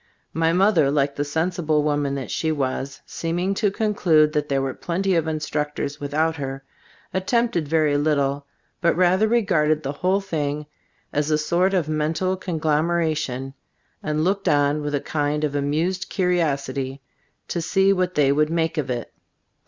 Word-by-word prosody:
My 165 Hz, 0 st, +2 dB
mother, 180 Hz, -5 st, +4 dB
like 140 Hz, -1 st, +1 dB
the 145 Hz, -, -1 dB
sensible 160 Hz, 0 st, 0 dB
woman 145 Hz, -2 st, 0 dB
that 135 Hz, -3 st, -5 dB
she 160 Hz, -, 0 dB
was, 135 Hz, -1 st, -3 dB
seeming 175 Hz, +4 st, -2 dB
to 205 Hz, +1 st, +1 dB
conclude 180 Hz, -8 st, +2 dB
that 150 Hz, -1 st, -1 dB
there 135 Hz, -1 st, +1 dB
were 135 Hz, -1 st, -2 dB
plenty 190 Hz, +3 st, -1 dB
of 165 Hz, -2 st, +1 dB
instructors 150 Hz, -1 st, -3 dB
with 145 Hz, 0 st, -5 dB
out 160 Hz, +1 st, +1 dB
her, 135 Hz, -1 st, -5 dB, 0.5 s
attempted 190 Hz, -3 st, 0 dB
very 155 Hz, -1 st, +2 dB
little, 140 Hz, -1 st, 0 dB, 0.3 s
but 170 Hz, -1 st, +2 dB
rather 185 Hz, +4 st, +4 dB
regarded 155 Hz, -9 st, +2 dB
the 135 Hz, -, -2 dB
whole 185 Hz, +7 st, +1 dB
thing 150 Hz, -6 st, -3 dB, 0.5 s
as 150 Hz, +1 st, 0 dB
a 155 Hz, -, +3 dB
sort 175 Hz, +5 st, +1 dB
of 170 Hz, -5 st, +1 dB
mental 155 Hz, +4 st, 0 dB
conglomeration, 155 Hz, -5 st, -1 dB, 0.5 s
and 155 Hz, 0 st, -1 dB
looked 195 Hz, +3 st, +1 dB
on 145 Hz, +1 st, +2 dB
with 145 Hz, 0 st, -2 dB
a 140 Hz, -, -1 dB
kind 150 Hz, 0 st, -1 dB
of 150 Hz, -2 st, 0 dB
amused 155 Hz, +6 st, -1 dB
curi 180 Hz, -2 st, +1 dB
osity 140 Hz, -4 st, -1 dB, 0.5 s
to 170 Hz, -, -2 dB
see 195 Hz, +4 st, +3 dB
what 185 Hz, -1 st, -1 dB
they 140 Hz, -2 st, +4 dB
would 150 Hz, +2 st, +2 dB
make 165 Hz, -1 st, 0 dB
of 140 Hz, -3 st, -3 dB
it. 120 Hz, -2 st, -4 dB
155 Hz, 165 wpm, -23 LUFS, 145-175 Hz, 0.5 s, mother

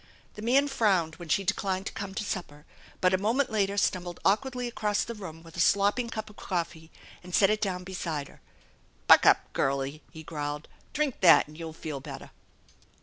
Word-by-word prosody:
The 210 Hz, -, -9 dB
man 265 Hz, +6 st, +3 dB
frowned 190 Hz, -, +1 dB
when 175 Hz, -2 st, -10 dB
she 195 Hz, +5 st, +1 dB
decUned 190 Hz, 0 st, -1 dB
to -, -, -3 dB
come 195 Hz, -1 st, -6 dB
to 215 Hz, -, -2 dB
supper, 150 Hz, -7 st, -5 dB, 0.4 s
but 185 Hz, 0 st, +4 dB
a 185 Hz, -, +3 dB
moment 240 Hz, +6 st, +1 dB
later 200 Hz, -2 st, 0 dB
stumbled 180 Hz, -3 st, -1 dB
awkwardly 250 Hz, +4 st, +1 dB
across 215 Hz, -3 st, 0 dB
the 235 Hz, -, -5 dB
room 165 Hz, -7 st, -9 dB
with 165 Hz, -1 st, -14 dB
a -, -, -6 dB
slopping 205 Hz, +7 st, +3 dB
cup 220 Hz, -1 st, -5 dB
of 210 Hz, -, -15 dB
coffee 165 Hz, -3 st, -4 dB, 0.3 s
and 180 Hz, 0 st, -3 dB
set 195 Hz, 0 st, +5 dB
it 215 Hz, -, 0 dB
down 185 Hz, -3 st, -2 dB
beside 165 Hz, -6 st, -4 dB
her. -, -, -18 dB, 0.3 s
" -, -, -35 dB
Buck -, -, +8 dB
up, -, -, +4 dB
girlie! 135 Hz, +2 st, -1 dB
" -, -, -29 dB
he 160 Hz, -1 st, -10 dB
growled. 150 Hz, -1 st, -5 dB
" -, -, -33 dB
Drink 295 Hz, -4 st, -1 dB
that 175 Hz, -5 st, +7 dB
and 150 Hz, -, -14 dB
you'll 165 Hz, 0 st, -6 dB
feel 155 Hz, -3 st, -6 dB
better." -, -, -9 dB
190 Hz, 205 wpm, -28 LUFS, 160-215 Hz, 0.4 s, Buck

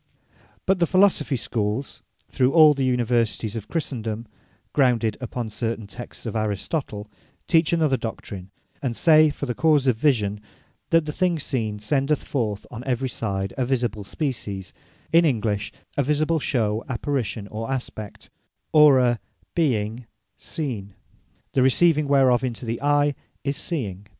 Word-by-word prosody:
But 190 Hz, 0 st, +2 dB
the 170 Hz, -, +3 dB
Philosophy 185 Hz, -7 st, +3 dB
schooles, 115 Hz, +1 st, -2 dB, 0.3 s
through 130 Hz, 0 st, +1 dB
all 155 Hz, -2 st, +8 dB
the 135 Hz, -1 st, -2 dB
Universities 120 Hz, -3 st, 0 dB
of 110 Hz, -, -5 dB
Christendome, 115 Hz, -8 st, -3 dB, 0.5 s
grounded 120 Hz, -6 st, +2 dB
upon 120 Hz, -2 st, -4 dB
certain 115 Hz, 0 st, -3 dB
Texts 120 Hz, +6 st, -9 dB
of 115 Hz, -, -4 dB
Aristotle, 105 Hz, -, -2 dB, 0.4 s
teach 165 Hz, -2 st, +3 dB
another 155 Hz, -5 st, +2 dB
doctrine; 100 Hz, -5 st, -6 dB, 0.3 s
and 125 Hz, -4 st, -2 dB
say, 155 Hz, +1 st, +6 dB
For 145 Hz, -, -4 dB
the 125 Hz, -, -2 dB
cause 150 Hz, -1 st, +3 dB
of 125 Hz, -4 st, +3 dB
Vision, 105 Hz, -7 st, +1 dB, 0.5 s
that 165 Hz, -1 st, +4 dB
the 150 Hz, -, -3 dB
thing 180 Hz, +1 st, +1 dB
seen, 115 Hz, -8 st, -2 dB
sendeth 140 Hz, +7 st, 0 dB
forth 110 Hz, -7 st, -2 dB
on 120 Hz, 0 st, -7 dB
every 130 Hz, 0 st, -1 dB
side 95 Hz, -5 st, -3 dB
a -, -, +2 dB
Visible 120 Hz, -4 st, -1 dB
Species(in 115 Hz, -, -2 dB
English) 110 Hz, -8 st, 0 dB, 0.2 s
a -, -, +2 dB
Visible 150 Hz, +4 st, +1 dB
Shew, 110 Hz, -5 st, 0 dB
Apparition, 120 Hz, -5 st, -2 dB
or 110 Hz, +2 st, -5 dB
Aspect, 110 Hz, -5 st, -6 dB, 0.4 s
or 150 Hz, -3 st, +8 dB
a 120 Hz, -2 st, +2 dB, 0.3 s
Being 115 Hz, -6 st, 0 dB, 0.3 s
Seen; 115 Hz, -, -5 dB, 0.6 s
the 130 Hz, -, +3 dB
receiving 150 Hz, +3 st, +4 dB
whereof 135 Hz, -3 st, +4 dB
into 125 Hz, -1 st, -3 dB
the 115 Hz, 0 st, -3 dB
Eye, 145 Hz, 0 st, +3 dB, 0.3 s
is 140 Hz, 0 st, -1 dB
Seeing. 105 Hz, -, -4 dB
125 Hz, 140 wpm, -24 LUFS, 110-145 Hz, 0.6 s, all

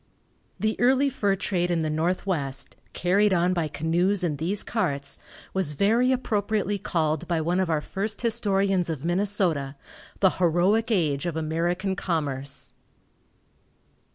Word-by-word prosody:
The 215 Hz, 0 st, 0 dB
early 265 Hz, +3 st, +3 dB
fur 205 Hz, -6 st, +1 dB
trade 180 Hz, -2 st, -1 dB
in 170 Hz, -2 st, +1 dB
the 155 Hz, -, -1 dB
Northwest, 160 Hz, -4 st, -2 dB, 0.2 s
carried 195 Hz, +3 st, +2 dB
on 175 Hz, +1 st, +2 dB
by 170 Hz, -3 st, 0 dB
canoes 175 Hz, +6 st, +1 dB
and 150 Hz, -5 st, -1 dB
these 185 Hz, +6 st, +1 dB
carts, 140 Hz, -11 st, -2 dB, 0.3 s
was 185 Hz, -6 st, +1 dB
very 225 Hz, -, +3 dB
appropriately 210 Hz, -4 st, 0 dB
called 160 Hz, -6 st, -1 dB
by 170 Hz, -2 st, 0 dB
one 170 Hz, +3 st, 0 dB
of 185 Hz, -2 st, 0 dB
our 155 Hz, -2 st, +1 dB
first 205 Hz, +7 st, -4 dB
historians 195 Hz, -6 st, +1 dB
of 155 Hz, -2 st, -4 dB
Minnesota, 175 Hz, -6 st, +1 dB, 0.4 s
"The 190 Hz, -2 st, +5 dB
heroic 185 Hz, +7 st, +3 dB
age 160 Hz, -8 st, +1 dB
of 170 Hz, -, -3 dB
American 175 Hz, +4 st, -1 dB
commerce." 140 Hz, -6 st, -2 dB
180 Hz, 135 wpm, -25 LUFS, 160-205 Hz, 0.4 s, The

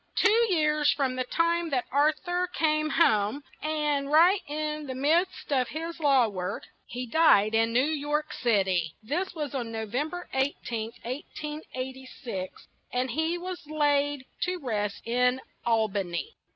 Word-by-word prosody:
Two 455 Hz, +2 st, +4 dB
years 305 Hz, -3 st, +3 dB
from 265 Hz, -3 st, 0 dB
the 255 Hz, 0 st, -1 dB
time 335 Hz, +4 st, +1 dB
that 255 Hz, -4 st, 0 dB
Ar 290 Hz, +3 st, +4 dB
thur 355 Hz, +3 st, -2 dB
came 310 Hz, -3 st, +1 dB
home, 220 Hz, -4 st, +2 dB, 0.2 s
and 300 Hz, -2 st, -1 dB
right 350 Hz, +6 st, +6 dB
in 300 Hz, 0 st, -3 dB
the 260 Hz, -, -4 dB
midst 315 Hz, +4 st, +1 dB
of 255 Hz, -2 st, +2 dB
his 330 Hz, +3 st, -5 dB
law 275 Hz, -6 st, +4 dB
work, 185 Hz, -3 st, -4 dB, 0.2 s
he 250 Hz, +1 st, -5 dB
died 225 Hz, -7 st, +4 dB
in 225 Hz, +1 st, +3 dB
New 250 Hz, +3 st, +3 dB
York 300 Hz, 0 st, -1 dB
Cit 215 Hz, -6 st, +2 dB
y; 185 Hz, -2 st, +2 dB, 0.2 s
this 345 Hz, -, -2 dB
was 295 Hz, -4 st, -4 dB
on 240 Hz, -4 st, -3 dB
No 220 Hz, -1 st, -3 dB
vem 255 Hz, +9 st, -2 dB
ber 355 Hz, +1 st, -7 dB
18th, 240 Hz, -4 st, -2 dB
1886; 260 Hz, -6 st, -6 dB, 0.2 s
and 250 Hz, 0 st, -1 dB
he 320 Hz, +6 st, 0 dB
was 355 Hz, -2 st, -7 dB
laid 290 Hz, -2 st, +1 dB, 0.2 s
to 365 Hz, 0 st, 0 dB
rest 210 Hz, -, -3 dB
in 250 Hz, +2 st, +2 dB, 0.3 s
Al 225 Hz, -2 st, +3 dB
ba 200 Hz, -1 st, -1 dB
ny. 170 Hz, -4 st, -4 dB
285 Hz, 160 wpm, -28 LUFS, 240-310 Hz, 0.3 s, right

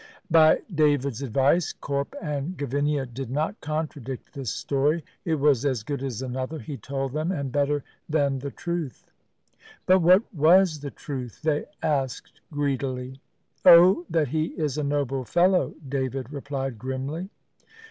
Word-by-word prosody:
By 160 Hz, -1 st, +6 dB
David's 145 Hz, -5 st, +2 dB
advice, 140 Hz, +6 st, +2 dB
Corp 140 Hz, 0 st, -3 dB
and 150 Hz, +1 st, -4 dB
Gavinia 145 Hz, +1 st, 0 dB
did 125 Hz, 0 st, -7 dB
not 155 Hz, -, -2 dB
contradict 145 Hz, -4 st, -5 dB
this 135 Hz, -4 st, -4 dB
story. 145 Hz, +8 st, 0 dB, 0.2 s
It 165 Hz, -3 st, +1 dB
was 145 Hz, -4 st, +3 dB
as 130 Hz, -6 st, 0 dB
good 140 Hz, +3 st, -4 dB
as 130 Hz, -3 st, -4 dB
another, 130 Hz, +4 st, -4 dB
he 150 Hz, -1 st, -6 dB
told 135 Hz, +2 st, -4 dB
them, 155 Hz, +4 st, -1 dB
and 140 Hz, -7 st, -3 dB
better 145 Hz, +1 st, +1 dB, 0.3 s
than 140 Hz, -3 st, +1 dB
the 140 Hz, +2 st, -5 dB
truth. 170 Hz, -2 st, -5 dB, 0.8 s
But 185 Hz, +1 st, +5 dB
what 180 Hz, +4 st, +6 dB
was 165 Hz, +1 st, +5 dB
the 145 Hz, 0 st, -5 dB
truth? 130 Hz, -2 st, -7 dB
they 150 Hz, -2 st, +1 dB, 0.2 s
asked 135 Hz, -4 st, -2 dB
greedily. 135 Hz, -2 st, -2 dB, 0.4 s
"Oh, 175 Hz, +1 st, +7 dB
that 160 Hz, -4 st, +1 dB
he 155 Hz, +2 st, 0 dB
is 150 Hz, -4 st, -1 dB
a 150 Hz, -, -1 dB
noble 140 Hz, -2 st, -1 dB
fellow," 180 Hz, +7 st, +2 dB
David 130 Hz, 0 st, -3 dB
replied 135 Hz, -4 st, -4 dB
grimly. 135 Hz, -, -4 dB
145 Hz, 145 wpm, -25 LUFS, 135-155 Hz, 0.8 s, Oh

